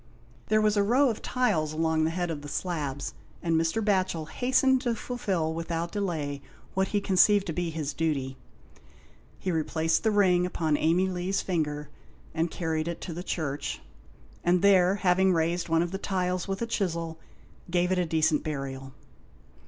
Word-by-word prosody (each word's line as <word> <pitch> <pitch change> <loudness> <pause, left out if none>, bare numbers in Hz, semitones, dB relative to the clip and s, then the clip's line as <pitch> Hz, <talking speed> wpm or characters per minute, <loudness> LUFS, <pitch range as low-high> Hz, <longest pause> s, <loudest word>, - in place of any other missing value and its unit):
There 215 0 +3
was 210 0 +2
a - - +5
row 250 +6 +4
of 220 - -7
tiles 160 -12 0
along 160 0 +1
the - - +1
head 175 0 -2
of 150 -3 -5
the 145 - -8
slabs, 145 -4 -3 0.3
and 165 -1 +1
Mr. 165 +7 +1
Batchel 185 -6 0
hastened 260 +1 +2
to 240 -3 0
fulfil 190 -10 -2
without 165 +1 -3
delay, 155 -8 -2 0.3
what 190 0 +1
he 205 - 0
conceived 200 +1 +4
to 165 - -3
be 175 +1 -1
his 155 -2 -3
duty. 140 -5 -1 1.0
He 185 - -2
replaced 160 0 +1
the 220 - +3
ring 190 -4 +4
upon 160 -4 0
Amey 170 +5 +2
Lee's 185 +1 -1
finger 150 -4 -2 0.4
and 165 +1 0
carried 160 -1 -2
it 170 - -3
into 175 - -6
the 175 - -5
church, 150 -6 -3 0.6
and 175 +1 +2
there, 190 -1 +5
having 190 -1 +3
raised 170 +1 0
one 165 +1 +3
of 175 - -4
the 195 - -4
tiles 185 -2 -1
with 195 +3 -2
a - - 0
chisel, 170 -7 -2 0.5
gave 180 +1 +1
it 180 -1 +2
decent 160 -1 +2
burial. 135 -3 -5
175 Hz, 170 wpm, -28 LUFS, 160-190 Hz, 1.0 s, a